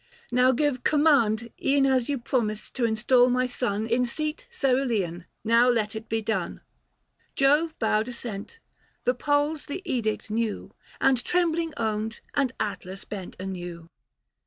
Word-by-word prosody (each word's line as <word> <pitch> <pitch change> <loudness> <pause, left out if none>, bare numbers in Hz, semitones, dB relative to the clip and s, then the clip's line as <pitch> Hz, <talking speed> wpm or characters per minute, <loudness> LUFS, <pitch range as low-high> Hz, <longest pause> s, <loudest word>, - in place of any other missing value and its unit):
Now 250 +1 +5
give 260 -1 0
command, 235 -7 +3
E'en 275 0 +4
as 260 -2 +2
you 285 - +1
promised 230 -4 -2
to 245 - 0
install 240 +3 +4
my 250 +1 +2
son 230 -4 -1
In 240 +2 +1
seat 305 +5 -4
cerulean, 240 - 0 0.2
now 230 +3 +5
let 220 -3 +1
it 220 +1 -7
be 225 0 -1
done." 205 -5 -2 0.7
Jove 295 +4 +3
bowed 220 0 +1
assent; 235 - -6 0.5
the 250 - +4
poles 290 +3 0
the 370 +7 -5
edict 220 -8 -2
knew, 225 -1 -2 0.3
And 260 -2 +3
trembling 335 -2 0
owned, 220 0 -2
and 275 -4 +1
Atlas 195 -2 -4
bent 195 -3 -7
anew. 175 -3 -6
240 Hz, 140 wpm, -26 LUFS, 215-275 Hz, 0.7 s, Now